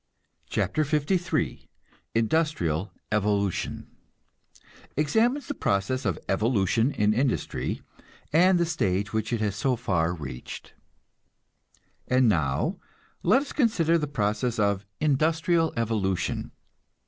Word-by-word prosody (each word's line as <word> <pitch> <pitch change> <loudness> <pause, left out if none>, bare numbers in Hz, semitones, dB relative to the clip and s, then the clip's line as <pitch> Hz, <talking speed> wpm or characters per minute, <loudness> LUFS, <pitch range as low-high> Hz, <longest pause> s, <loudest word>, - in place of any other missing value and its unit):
CHAPTER 155 - 0
LIII 155 +4 -1 0.5
INDUSTRIAL 110 - +1 0.2
EVOLUTION 100 -2 0 1.1
(Examines 230 - +2
the - - -2
process 100 +7 0
of 95 -5 0
evolution 110 +3 +2
in 105 -6 +2
industry 130 +3 -1 0.5
and 180 +3 +5
the 170 - +2
stage 100 - -1
which 110 +1 -1
it 115 -2 0
has 105 -2 0
so 130 +2 +1
far 90 -8 0
reached.) 70 -8 -8 1.3
And 130 -1 +4
now 75 -10 +1 0.4
let 235 +10 +4
us - - -9
consider 170 - +2
the 150 - -2
process 115 -1 -1
of 100 -1 +1
industrial 160 +3 +2
evolution. 105 -5 -1
115 Hz, 105 wpm, -26 LUFS, 100-155 Hz, 1.3 s, and